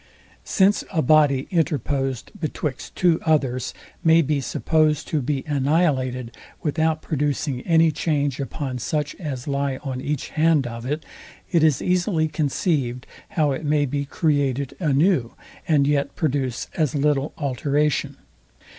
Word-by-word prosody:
Since 200 +1 +3
a 165 -5 +1
body 140 -1 +4
interposed 140 - -1
betwixt 150 -3 -4
two 175 -3 +3
others 135 -6 +1 0.3
may 165 0 +5
be 145 0 0
supposed 155 +3 +1
to 155 - 0
be 135 +1 -2
annihilated, 135 -5 0 0.3
without 160 +1 0
producing 145 -3 -1
any 165 -1 +5
change 145 -3 -1
upon 135 -2 -4
such 150 +4 -2
as 140 -7 -5
lie 140 -1 -1
on 130 -3 -4
each 145 0 -3
hand 160 -3 +2
of 115 0 -6
it, 150 +3 -3 0.5
it 170 -3 +3
is 155 -4 +3
easily 180 -3 +1
conceived, 145 -4 -1 0.3
how 150 -3 +3
it 135 +4 -3
may 150 -1 +2
be 140 +1 -2
created 140 -3 0
anew, 150 -4 +2 0.3
and 150 -4 +4
yet 140 0 0
produce 135 -6 -1
as 155 -3 0
little 145 0 +1
alteration. 145 +1 0
145 Hz, 135 wpm, -23 LUFS, 135-155 Hz, 0.5 s, may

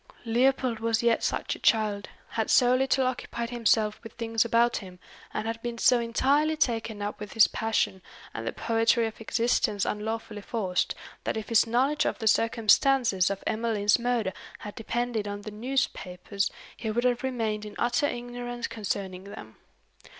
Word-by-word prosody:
Leopold 250 0 +2
was 225 0 0
yet 235 -1 +2
such - - -1
a - - -12
child, 210 -2 +1 0.2
had 220 -1 -2
so 250 -1 +5
little 265 0 +2
occupied 240 -1 -3
himself 220 -3 +2
with 225 -1 -11
things 225 -1 0
about 235 +1 +2
him, 185 -3 -9 0.3
and - - -3
had 225 0 -3
been 240 0 -4
so 245 +1 +4
entirely 280 +7 +2
taken 225 -6 -1
up 205 - -4
with 210 -1 -7
his 225 -2 +7
passion, 210 -3 -1 0.3
and 115 0 -5
the - - 0
poetry 230 +1 +2
of 225 0 -6
existence 225 -2 +1
unlawfully 215 0 -4
forced, 195 -4 -1 0.3
that - - -2
if 220 - -5
his 230 0 +4
knowledge 265 +6 +2
of - - -2
the 225 - -5
circumstances 225 -2 +3
of 200 -1 -4
Emmeline's 215 -1 +1
murder 235 -5 0 0.2
had 210 - -8
depended 230 -1 -2
on 205 0 -5
the 215 - -7
newspapers, 210 -5 -2 0.3
he 220 - -4
would 235 +3 0
have 245 -1 +2
remained 225 -5 -2
in 210 -1 -9
utter 240 +4 +1
ignorance 245 -1 -5
concerning 195 -3 -4
them. 110 - -10
225 Hz, 165 wpm, -27 LUFS, 210-240 Hz, 0.3 s, his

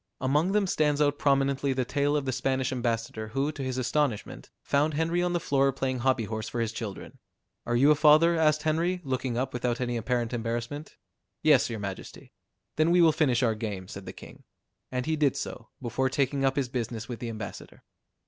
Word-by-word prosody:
Among 150 +8 +1
them 210 -1 +3
stands 150 -5 +1
out 145 -1 +2
prominently 140 -1 +2
the 130 -1 -1
tale 145 +3 0
of 145 - -2
the 130 - 0
Spanish 130 +1 -1
ambassador 115 -3 -2
who 135 +7 -1
to 150 - -8
his 130 -1 -3
astonishment, 130 -3 -1
found 145 +2 +1
Henry 165 +3 +1
on 175 0 0
the 175 - +1
floor 140 -4 +2
playing 130 -1 -2
hobby 130 -1 +1
horse 110 +1 -4
for 120 - -4
his 115 -1 0
children. 110 -4 -7 0.5
"Are 120 - +1
you 140 +5 +5
a - - +5
father?" 155 +3 +5
asked 155 -2 +2
Henry, 170 +3 0
looking 130 -3 -2
up 130 +1 -2
without 125 -1 -1
any 120 -1 -1
apparent 120 0 -1
embarrassment. 120 +5 -4 0.5
"Yes, 150 -6 +5
your 115 - -4
majesty." 100 -2 -7 0.4
"Then 155 +2 +3
we 175 +1 +4
will 165 -2 +6
finish 140 -6 +2
our 115 -2 +3
game," 105 -4 -5
said 100 -1 -9
the - - -4
king. - - -13 0.5
And 125 -1 -2
he 160 - 0
did 145 -3 +2
so, 115 -3 -6
before 130 +2 -1
taking 135 +1 0
up 135 0 +2
his 140 -3 0
business 115 -2 -4
with 120 -3 -6
the 120 - -4
ambassador. 110 -3 -8
130 Hz, 205 wpm, -28 LUFS, 120-150 Hz, 0.5 s, will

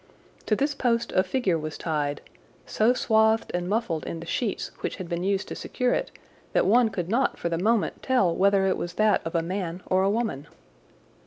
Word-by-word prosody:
To 215 - +3
this 285 +5 0
post 235 -3 0
a 185 - +4
figure 190 -6 0
was 155 0 -5
tied, 150 -3 -2 0.4
so 220 +3 +2
swathed 220 -1 +2
and 175 0 -2
muffled 200 -7 -1
in 165 - -5
the 165 - -8
sheets 210 +4 -2
which - - -3
had 185 -3 -7
been 170 0 -3
used 195 0 0
to - - -5
secure 250 -1 -1
it - - -1 0.4
that - - +3
one 230 +3 +4
could 180 -5 -4
not 240 +7 +1
for 170 - -2
the 165 -1 -1
moment 220 +3 +1
tell 220 -10 +2
whether 195 0 +3
it 190 - +1
was 175 - -4
that 215 +2 +3
of 165 +1 -5
a 165 - +2
man 180 0 -4
or 185 0 +2
a 195 - +2
woman. 205 - -2
195 Hz, 210 wpm, -26 LUFS, 170-225 Hz, 0.4 s, a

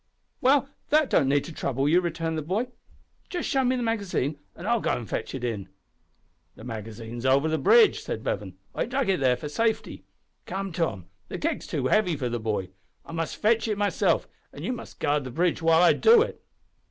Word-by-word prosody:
"Well, 275 +1 +4 0.2
that 305 -2 +3
don't 135 -4 +3
need 140 0 +3
to 165 - -8
trouble 135 -1 -1
you," 170 +4 +4
returned 165 -2 -2
the 155 - -2
boy, 200 - -1 0.6
"just 355 -2 -3
show 270 -3 +2
me 255 +1 +2
the 245 - -2
magazine, 200 - -1 0.2
an' 175 - -9
I'll 235 +2 +2
go - - -1
an' 120 - -1
fetch - - -4
it 130 - -6
in!" 105 -6 -3 0.9
"The - - -12
magazine's 115 0 -7
over 135 +3 +3
the 160 0 0
bridge," 455 -1 +6
said - - -5
Bevan. - - -3 0.2
"I - - -1
dug 260 -2 -1
it 190 - +2
there 125 -2 +3
for 150 - -6
safety. 220 +8 -1 0.4
Come, 195 0 -3
Tom, 160 - -2 0.2
the - - -5
keg's - - -2
too - - -2
heavy 200 -6 +2
for 130 -4 -2
the 120 0 -2
boy. 105 -4 -2 0.4
I - - -10
must 165 -1 -3
fetch 225 +1 +2
it 210 -2 -1
myself, 205 0 +1 0.2
and - - -8
you 255 - -1
must 235 - -9
guard 145 0 +1
the 130 - -6
bridge 170 +7 0
while 165 +1 +5
I 175 - +7
do 450 0 +6
it." - - -8
165 Hz, 210 wpm, -26 LUFS, -, 0.9 s, I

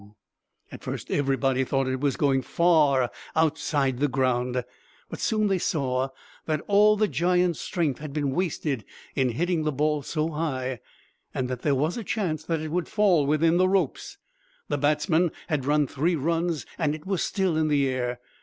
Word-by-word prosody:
"At - - -9
first - - -5
everybody 135 -2 +1
thought 135 0 0
it 130 0 -1
was 140 -1 0
going 135 -2 +2
far 145 -4 +3 0.2
outside 145 -4 +1
the 145 - +3
ground. 125 -2 0 0.5
But - - -6
soon 215 -1 +1
they 195 -2 +1
saw 135 -5 0 0.4
that 155 -2 0
all 210 +1 +5
the 215 0 +3
giant's 180 -2 +1
strength 160 -9 -1
had 150 -1 -7
been 145 -1 -1
wasted 150 - -1 0.3
in 130 -2 +1
hitting 175 +4 0
the 155 0 0
ball 150 +1 0
so 155 +3 -2
high, 130 -6 -2 0.6
and 130 - -1
that 125 -1 -4
there 145 -2 +2
was 155 - 0
a 230 - -4
chance 175 -7 -2
that 165 -2 -1
it 155 -1 -5
would 175 +1 -1
fall 185 -9 +3
within 160 +3 +3
the 185 +1 +4
ropes. 195 0 -1 0.5
The - - 0
batsmen 155 +4 +2 0.2
had 145 -4 -1
run 150 +1 +3
three 155 +6 0
runs 165 +1 -1
and 155 -3 +1
it 155 - -12
was 190 -2 -1
still 190 -4 0
in 155 0 +2
the 145 -2 +2
air. 125 -1 -2
150 Hz, 180 wpm, -26 LUFS, 135-170 Hz, 0.6 s, all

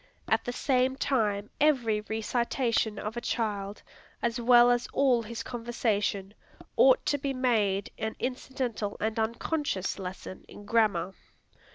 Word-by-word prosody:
At - - +2
the 245 - -3
same 260 +1 +1
time 210 -7 0
every 240 -8 +3
recitation 225 0 -1
of 210 +3 -5
a 240 - -3
child, 205 -4 -3 0.4
as 235 +1 0
well 240 0 +6
as 245 0 +1
all 260 -4 +3
his 230 +1 -6
conversation, 220 -4 -2 0.4
ought - - +5
to 290 - +1
be 275 -1 -2
made 210 -6 +1
an 220 0 -3
incidental 250 -4 -3
and 220 +1 -1
unconscious 230 - -2
lesson 185 0 -7
in 205 - -12
grammar. 205 -5 +1
230 Hz, 135 wpm, -28 LUFS, 210-250 Hz, 0.4 s, well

